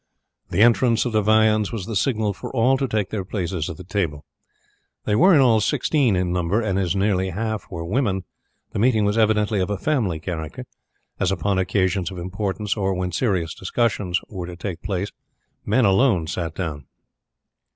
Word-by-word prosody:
The 105 - +3
entrance 120 0 +4
of 120 - -1
the 110 -1 +2
viands 110 0 +3
was 110 -6 -4
the 110 - -5
signal 110 -2 +1
for - - -8
all 130 +2 +3
to 135 0 -1
take 105 -4 -1
their 105 -3 -2
places 90 -4 -3
at 80 - -7
the - - -9
table. 85 -7 -2 0.8
There 105 - +1
were 185 +1 +6
in 145 - +6
all 115 -4 +4
sixteen 130 -1 +2
in 90 -1 0
number, 90 +4 +1
and 100 -4 0
as 90 -1 0
nearly 95 -1 +1
half 110 +3 -3
were 85 -4 -5
women 100 -2 0 0.5
the - - -3
meeting 110 -2 +3
was 105 +1 +1
evidently 110 -1 +2
of 95 - 0
a 105 - -1
family 110 - 0
character, 80 -2 -5 0.5
as - - +1
upon 95 0 0
occasions 95 -2 0
of 95 - -8
importance 100 +3 -3
or 95 -3 0
when 90 0 -2
serious 90 -5 0
discussions 95 -3 -1
were 90 -4 -6
to 90 - -7
take 85 -1 -5
place 95 0 -3 0.6
men 130 -3 +3
alone 100 -3 +3
sat 85 0 -4
down. 75 -6 -5
100 Hz, 185 wpm, -22 LUFS, 90-110 Hz, 0.8 s, were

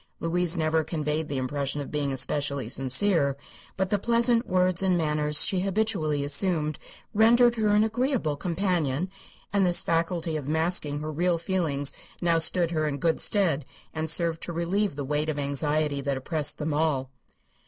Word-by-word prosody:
Louise 175 +1 +1
never 160 0 +1
conveyed 155 -1 -3
the 140 - -3
impression 140 +2 -2
of 145 - -6
being 145 -2 -1
especially 140 -1 -1
sincere, 140 - +1 0.4
but 190 +1 -1
the 205 - +2
pleasant 235 +2 +2
words 185 -1 +1
and 185 -2 +2
manners 150 -2 +2
she 190 - +1
habitually 190 -7 0
assumed 155 +1 0 0.3
rendered 235 +3 +5
her 220 -2 -1
an 210 - +4
agreeable 225 - -1
companion, 175 -1 -1 0.4
and 200 -1 +3
this 175 -1 +2
faculty 165 -1 -1
of 145 -3 -4
masking 155 -2 0
her 155 +1 -4
real 175 +3 0
feelings 165 -6 0 0.3
now 170 -2 +2
stood 170 +1 +3
her 155 -2 0
in 140 -1 -3
good 160 +3 0
stead 170 -9 +1 0.3
and 160 0 -2
served 165 0 +1
to - - -5
relieve 170 +2 -1
the 140 -1 -4
weight 150 +2 -1
of 150 - -2
anxiety 145 +1 0
that 140 -1 -2
oppressed 150 +2 -1
them 150 0 -3
all. 145 -4 0
160 Hz, 165 wpm, -26 LUFS, 145-185 Hz, 0.4 s, rendered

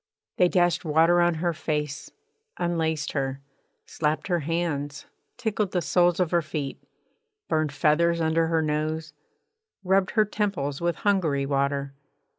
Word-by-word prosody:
They 180 - +5
dashed 175 -1 +2
water 165 +2 +4
on 175 -1 +3
her 170 +2 -1
face, 150 -3 -3 0.5
unlaced 160 -3 -1
her, 135 -1 -2 0.5
slapped 155 +3 -2
her 175 -1 +2
hands, 145 -3 -2 0.3
tickled 215 -5 -1
the 180 - +1
soles 175 +1 +3
of 180 -3 +1
her 170 -1 +3
feet, 155 -3 -5 0.7
burned 155 -2 0
feathers 170 +4 +2
under 165 0 +2
her 160 -1 +1
nose, 155 +1 -2 0.7
rubbed 190 +1 +2
her 215 - +6
temples 195 -10 -2
with 170 0 0
Hungary 165 -9 +1
water. 140 0 -1
160 Hz, 135 wpm, -26 LUFS, 150-175 Hz, 0.7 s, her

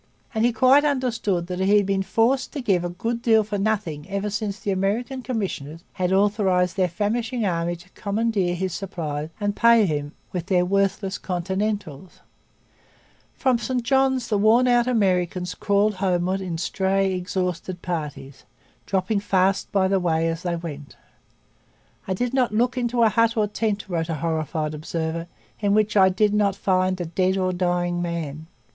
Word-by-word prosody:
And 220 -1 0
he 240 - +3
quite 260 +5 +5
understood 240 - 0
that 180 0 -5
he 195 +2 +4
had 205 - +2
been 195 0 0
forced 230 +7 +1
to 295 - -4
give 195 -7 +1
a 175 - -2
good 230 +7 -3
deal 220 -2 +4
for 205 -1 -3
nothing 195 -7 -2
ever 200 +1 -2
since 210 0 -3
the 200 - -2
American 215 +8 -1
commissioners 180 - -4
had 185 0 -1
authorized 190 -3 +2
their 185 -2 +1
famishing 225 +5 -1
army 170 -2 -1
to 175 +2 -16
commandeer 200 -3 -1
his 185 0 -2
supplies 160 -6 -4
and 205 -1 -1
pay 235 -2 +5
him 145 -3 -2 0.2
with 175 -1 -3
their 180 -2 +2
worthless 195 +1 0
'Continentals.' 190 -2 -3 1.1
From 255 -3 +1
St 250 0 -2
Johns 265 -1 +2
the 210 - +1
worn 225 +5 +4
out 240 0 +3
Americans 180 -6 +1
crawled 205 +2 +1
homewards 185 0 0
in 175 -3 -4
stray, 190 +2 0
exhausted 180 -1 -3
parties, 150 -5 -5 0.4
dropping 195 +2 0
fast 195 -1 +1
by 195 -2 +2
the 195 0 +2
way 165 -2 +1
as 165 0 -2
they 175 -2 -2
went. 150 -4 -8 1.1
'I 190 - -1
did 245 +5 -2
not 255 -4 +2
look 240 +4 +1
into 240 -1 +1
a 225 - +5
hut 230 +2 +2
or 215 - +3
a - - 0
tent,' 210 -1 -2
wrote 170 -3 -2
a 165 - -1
horrified 155 0 -2
observer, 160 +2 -4 0.3
'in 205 -1 +2
which 215 0 +2
I 190 -2 +6
did 205 +3 +2
not 205 -2 +2
find 185 -1 +1
a 175 - -2
dead 185 +3 0
or 185 -1 0
dying 175 -1 0
man.' 160 -3 -4
195 Hz, 175 wpm, -23 LUFS, 175-215 Hz, 1.1 s, I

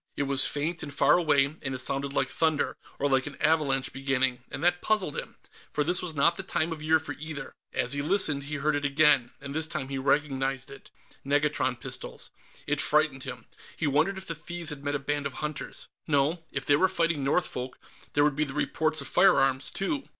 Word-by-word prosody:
It - - +1
was 140 -1 +5
faint 160 +4 -2
and 145 - -6
far 140 - +4
away, 150 -5 +3 0.2
and 135 -2 -3
it - - -5
sounded 140 +1 +1
like - - +1
thunder, 160 -2 0 0.2
or 145 - 0
like 135 0 +2
an 145 - -7
avalanche 150 -4 +1
beginning, 135 -2 0
and 140 - -6
that 175 0 +3
puzzled 210 -8 0
him, - - -6 0.4
for 150 - 0
this 175 +4 +4
was 170 -3 -2
not 170 +4 +3
the - - -3
time 170 -3 -1
of 160 -2 -5
year 160 +1 +3
for 150 -1 -7
either. 150 -2 -6 0.2
As 125 +2 0
he 140 - -1
listened, 145 -4 +2
he 150 +1 -4
heard 150 +1 0
it 145 - -2
again, 140 -3 +4
and 140 0 -7
this 155 +1 0
time 135 -3 -4
he 135 -1 -3
recognized 135 -1 0
it 140 - -13 0.3
negatron 140 -3 +1
pistols. - - -6 0.3
It 150 0 0
frightened 150 -3 +1
him; 125 -1 -7 0.3
he 160 - -1
wondered 155 +7 +2
if 190 - -7
the 165 - -4
thieves 165 +1 -3
had 145 -1 -8
met 145 0 -1
a - - +2
band 145 +1 -2
of 140 - -10
hunters. 150 +2 -6 0.2
No; 155 +3 +1
if 140 -1 -4
they 145 - +5
were 185 +4 +3
fighting 165 -5 0
Northfolk, 135 -4 -1 0.4
there 145 - +4
would 150 -2 +2
be 150 - +1
the 140 -2 -6
reports 155 0 0
of 140 - -5
firearms, 135 -8 +3
too. 275 +9 -2
145 Hz, 215 wpm, -28 LUFS, 135-160 Hz, 0.4 s, was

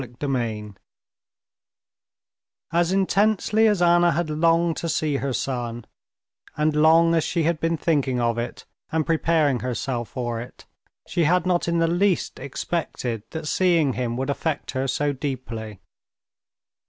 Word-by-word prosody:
Chapter 125 +2 -7
31 110 -6 -3 2.0
As 170 +1 +2
intensely 210 +3 +2
as 205 -4 +2
Anna 175 0 +5
had 160 0 -1
longed 165 +1 +2
to 170 - -3
see 155 -2 0
her 135 0 -2
son, 120 -3 -3 0.7
and 150 0 +1
long 165 +2 +5
as 165 -2 +2
she 170 - -1
had 165 0 0
been 165 +1 0
thinking 140 -6 0
of 115 -1 0
it 120 - -5 0.3
and 160 -1 0
preparing 160 -5 +2
herself 120 -1 -3
for 120 -3 -3
it, 125 - -12 0.4
she 170 - +1
had 180 +2 +2
not 180 -2 +1
in 170 0 +1
the 165 0 +3
least 175 +1 0
expected 135 -6 -3
that 160 -1 -6
seeing 165 -6 +2
him 120 -1 -2
would 135 +2 -1
affect 150 +1 -3
her 130 0 -2
so 145 +2 0
deeply. 120 -7 -5
150 Hz, 145 wpm, -24 LUFS, 125-170 Hz, 2.0 s, Anna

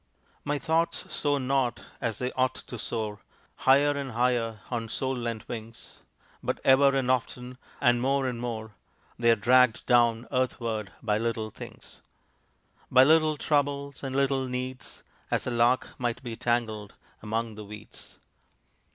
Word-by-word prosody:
My 145 0 0
thoughts 160 +5 0
soar 145 -1 +1
not 130 -2 0 0.2
as 115 -3 -1
they 125 0 -2
ought 130 0 +1
to 120 - -8
soar, 110 -2 -3 0.4
Higher 140 +2 +5
and 140 -3 -4
higher 115 -3 0
on 115 -2 -2
soul 130 +3 -1
lent 115 -3 -4
wings; 115 0 -8 0.4
But - - -2
ever 135 +1 +6
and 130 -1 +2
often, 125 0 -2 0.2
and 120 -1 +3
more 135 +1 +1
and 125 -2 -2
more 110 -2 -4 0.5
They 120 0 +4
are 115 - +7
dragged 125 +1 +4
down 120 -1 +3
earthward 115 -6 -1
by 105 -2 +1
little 115 -1 -2
things, - - -11 0.9
By 130 0 +7
little 155 +1 +4
troubles 140 -1 0
and 135 -1 -3
little 135 -1 +1
needs, 125 0 -6 0.3
As - - 0
a 125 - -2
lark 120 +2 +3
might 120 -1 -2
be 120 -2 -5
tangled 110 -4 -1 0.3
among 115 +1 -2
the 105 0 -8
weeds. 105 +1 -11
125 Hz, 150 wpm, -28 LUFS, 115-135 Hz, 0.9 s, are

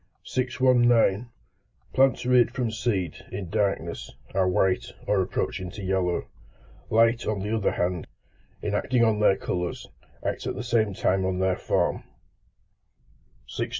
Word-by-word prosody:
619. 120 -4 +2 0.6
Plants 135 -2 +3
reared 125 -1 +5
from 120 -2 -2
seed, 110 -7 -2
in 95 -3 -5
darkness, 100 -6 -1 0.2
are 95 -1 +2
white, 95 +1 +1 0.2
or 105 -2 +2
approaching 95 0 -2
to 100 +2 -8
yellow. 95 -2 0 0.6
Light, 115 +2 +3
on 105 -2 0
the 105 +3 -1
other 110 - +1
hand, 90 -1 -1 0.6
in 105 - -1
acting 120 +3 +2
on 110 -2 +2
their 105 -2 +4
colours, 90 -1 -3 0.4
acts - - -2
at - - -2
the - - -4
same 110 -5 +1
time 95 +1 +1
on 95 0 -1
their 95 0 +1
form. - - 0 1.5
620. - - -4
105 Hz, 140 wpm, -26 LUFS, 95-120 Hz, 1.5 s, reared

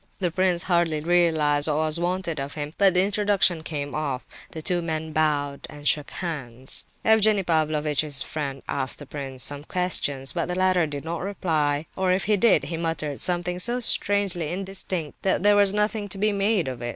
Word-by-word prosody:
The 180 -3 -1
prince 180 0 +1
hardly 170 -4 +1
realized 155 -3 +2
what 150 - 0
was 155 +1 +1
wanted 175 -2 -2
of 140 +1 -5
him, 150 0 -5
but 195 -2 +4
the 180 - +5
introduction 200 -4 +2
came 145 -3 -5
off; 140 -4 -3 0.2
the 160 - -8
two 175 +1 +2
men 160 -1 -3
bowed 145 -2 0
and 145 0 -6
shook 150 -2 +2
hands. 130 -7 -4 0.2
Evgenie 215 -2 +4
Pavlovitch's 155 -3 +1
friend 140 -3 -5
asked 130 - 0
the 145 - -10
prince 135 -2 -4
some 145 0 +1
question, 150 -6 +1
but - - -2
the 180 - -3
latter 185 -3 +2
did 145 0 -6
not 165 0 -4
reply, 155 -6 -1
or 190 -1 +1
if 185 0 +1
he 210 +5 +2
did, 215 +1 +3
he 165 - -4
muttered 160 -4 -3
something 180 0 0
so 240 +6 0
strangely 200 -8 +1
indistinct 185 -4 -4
that 190 -1 0
there 205 0 +5
was 200 -1 +5
nothing 210 0 -1
to 195 - -1
be 210 +2 +1
made 200 -3 +1
of 125 -2 -5
it. 120 - -3
165 Hz, 190 wpm, -24 LUFS, 150-190 Hz, 0.2 s, the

